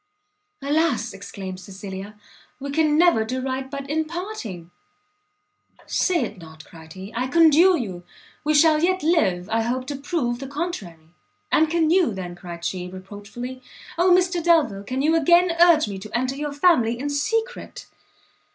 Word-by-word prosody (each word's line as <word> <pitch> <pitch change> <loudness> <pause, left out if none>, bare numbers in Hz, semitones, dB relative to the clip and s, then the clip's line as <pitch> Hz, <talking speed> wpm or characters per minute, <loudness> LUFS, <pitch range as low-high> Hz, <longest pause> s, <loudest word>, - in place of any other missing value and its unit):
"Alas!" 285 -5 0
exclaimed 195 -1 -8
Cecilia, 195 +1 -9 0.4
"we 280 +1 -5
can 305 0 +2
never 340 -10 +4
do 255 +4 -3
right 265 0 -3
but 280 0 -6
in 315 +2 -1
parting!" 310 - -7 1.1
"Say 360 -3 +1
it 205 - -6
not," 160 -2 -13
cried 160 -1 -14
he, 190 +3 -10
"I 250 +2 -1
conjure 335 +4 +5
you! 185 -8 -5 0.4
we 305 0 +1
shall 310 0 +5
yet 370 +1 +1
live, 190 - +1
I 225 0 +2
hope, 250 +3 -2
to 285 +1 -5
prove 275 -4 -2
the 270 - -6
contrary." 215 - -6 0.4
"And 315 0 +3
can 325 -1 +2
you, 345 - +3
then," 180 -2 -6
cried 175 -1 -9
she, 180 -1 -3
reproachfully, 205 +7 -9 0.3
"Oh 350 +2 +3
Mr 355 -1 +3
Delvile! 310 -13 +3
can 255 +6 -3
you 320 +2 +3
again 345 +3 +4
urge 340 -6 +6
me 200 -2 -6
to 215 +4 -4
enter 255 +2 -1
your 295 +1 -4
family 280 -7 +3
in 285 +3 -3
secret?" 450 +12 -2
265 Hz, 160 wpm, -23 LUFS, 200-325 Hz, 1.1 s, urge